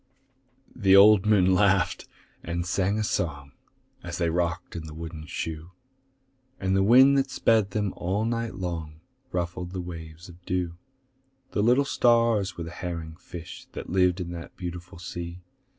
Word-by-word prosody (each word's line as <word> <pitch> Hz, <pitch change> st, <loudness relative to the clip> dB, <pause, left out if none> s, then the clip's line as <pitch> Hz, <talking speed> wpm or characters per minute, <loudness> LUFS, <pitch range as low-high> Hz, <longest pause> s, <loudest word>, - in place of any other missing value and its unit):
The 95 Hz, -5 st, +4 dB
old 105 Hz, 0 st, +7 dB
moon 95 Hz, -3 st, +4 dB
laughed 100 Hz, -1 st, +2 dB, 0.3 s
and 85 Hz, +1 st, -3 dB
sang 95 Hz, +3 st, 0 dB
a 110 Hz, -, 0 dB
song, 70 Hz, -10 st, -2 dB, 0.5 s
As -, -, -6 dB
they 85 Hz, -1 st, +1 dB
rocked 85 Hz, 0 st, -2 dB
in 80 Hz, -2 st, -6 dB
the 75 Hz, -, -9 dB
wooden 80 Hz, -1 st, -7 dB
shoe; 80 Hz, +2 st, -5 dB, 0.9 s
And 95 Hz, 0 st, 0 dB
the 95 Hz, -, +3 dB
wind 130 Hz, +7 st, +6 dB
that 135 Hz, 0 st, -1 dB
sped 110 Hz, -5 st, +2 dB
them 105 Hz, -1 st, -1 dB
all 95 Hz, +5 st, -1 dB
night 115 Hz, 0 st, -2 dB
long 80 Hz, -4 st, -5 dB, 0.3 s
Ruffled 90 Hz, 0 st, -3 dB
the 95 Hz, -, -3 dB
waves 85 Hz, -1 st, -8 dB
of 90 Hz, 0 st, -15 dB
dew; 90 Hz, -2 st, -2 dB, 0.8 s
The 105 Hz, -, 0 dB
little 125 Hz, +6 st, +4 dB
stars 115 Hz, -7 st, +2 dB
were 85 Hz, -, -4 dB
the 85 Hz, -, -7 dB
herring 85 Hz, -3 st, -5 dB
fish 85 Hz, -2 st, -10 dB
That -, -, -7 dB
lived 90 Hz, -1 st, +3 dB
in 85 Hz, -1 st, -4 dB
the 85 Hz, -1 st, -7 dB
beautiful 90 Hz, -1 st, -7 dB
sea. 85 Hz, 0 st, -7 dB
90 Hz, 160 wpm, -26 LUFS, 85-100 Hz, 0.9 s, old